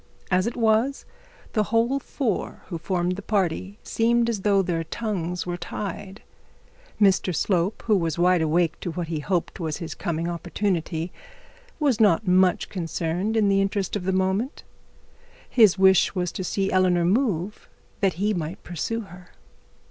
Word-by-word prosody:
As 185 +3 +3
it 235 - -4
was, 230 +4 +2 0.5
the 215 -2 +2
whole 235 +5 +1
four 245 -5 -3
who 170 -4 -4
formed 180 +1 -1
the - - -5
party 195 -1 -1
seemed 235 +1 +2
as 210 -4 -3
though 200 -1 +3
their 170 -2 -1
tongues 180 -3 -3
were 175 0 -3
tied. 195 +2 -6 0.8
Mr 190 -3 +3
Slope, 185 +3 0
who 215 - +4
was 165 -4 0
wide 180 0 +3
awake 160 +1 +1
to - - -4
what 170 0 -4
he 160 -2 -2
hoped 175 +4 -2
was 160 -3 -2
his 165 - -6
coming 170 -2 -3
opportunity, 175 -1 -2 0.7
was 275 -7 +2
not 210 -2 +4
much 185 0 +3
concerned 175 +4 -2
in 210 -2 +3
the 195 0 +3
interest 195 0 -1
of 190 -3 -3
the 190 - +1
moment. 190 - -1 0.8
His 215 -6 +5
wish 190 0 +4
was 180 -1 -1
to 185 - -5
see 195 +2 -1
Eleanor 180 -2 +3
move, 205 - 0 0.3
that 195 -3 +2
he 205 +5 0
might 170 -1 -4
pursue 200 +7 -3
her. 180 -3 -13
190 Hz, 160 wpm, -24 LUFS, 175-210 Hz, 0.8 s, His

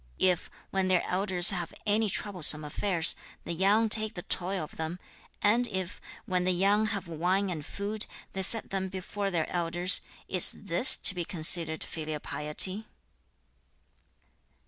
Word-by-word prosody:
If, 180 -2 -1 0.2
when 190 -1 -2
their 185 -2 +1
elders 185 -1 +3
have 175 -3 -5
any 210 +1 0
troublesome 175 -6 +3
affairs, 165 +2 0 0.3
the - - -6
young 200 +6 +1
take 215 0 +2
the 175 - -8
toil 185 0 -2
of 150 - -12
them, 160 +2 -6 0.5
and 235 +4 +1
if, 190 -2 -6 0.2
when 180 -1 -2
the 185 - 0
young 200 +4 0
have 200 -3 -5
wine 180 +4 -2
and 155 -4 -7
food, 205 +6 -5 0.3
they 190 - -4
set 220 +4 +4
them 190 -1 -4
before 195 +2 -6
their 170 -4 -2
elders, 175 +1 -1 0.3
is 185 -2 +7
THIS 200 +5 +3
to - - +6
be 175 -2 -4
considered 160 -1 +3
filial 155 -2 -7
piety?' 185 +10 0
185 Hz, 150 wpm, -27 LUFS, 170-200 Hz, 0.5 s, is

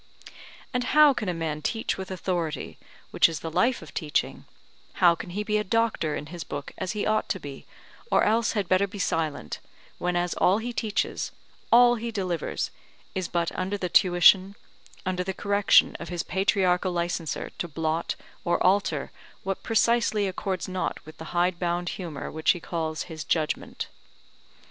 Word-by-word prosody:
And 250 0 +1
how 300 -2 +8
can 215 -6 -3
a - - +2
man 155 -2 -3
teach 225 +8 -1
with 190 -1 -6
authority, 175 -5 -3 0.3
which - - +5
is 160 -4 -5
the 165 - -5
life 235 +4 +2
of 150 - -13
teaching; 150 -2 -1 0.5
how 175 -2 +5
can 170 - -7
he 205 +4 -3
be 210 0 +1
a - - 0
doctor 225 -8 +1
in - - -5
his 175 - -5
book 145 0 -6
as 190 0 -2
he 210 - -2
ought 215 0 +1
to 190 - -1
be, 145 -4 -9 0.4
or - - +4
else 225 +1 +2
had 205 -4 -1
better 185 +2 +3
be 205 - -9
silent, 160 - -2 0.4
whenas 175 0 0
all 190 +3 +3
he 240 +2 -4
teaches, 215 -3 -1 0.4
all 240 0 +7
he 235 +1 -4
delivers, 185 -7 -2 0.4
is 185 -2 -2
but 170 -1 -1
under 190 +2 -2
the 180 -2 -3
tuition, 185 +2 +5 0.5
under 180 0 -1
the 190 0 -4
correction 200 0 +4
of 170 - -7
his 175 -1 -2
patriarchal 185 -1 +1
licenser 170 -2 -2
to 175 - -2
blot 160 +1 -1 0.3
or 175 - +2
alter 195 +2 +2 0.3
what 195 0 -3
precisely 225 -2 +2
accords 185 0 -3
not 185 -1 -2
with 155 0 -13
the 160 - -7
hidebound 175 0 0
humour 165 -7 -5
which 160 0 -1
he 175 - -7
calls 160 -2 -3
his 160 -3 -7
judgment? 155 -2 -1
180 Hz, 170 wpm, -26 LUFS, 165-205 Hz, 0.5 s, how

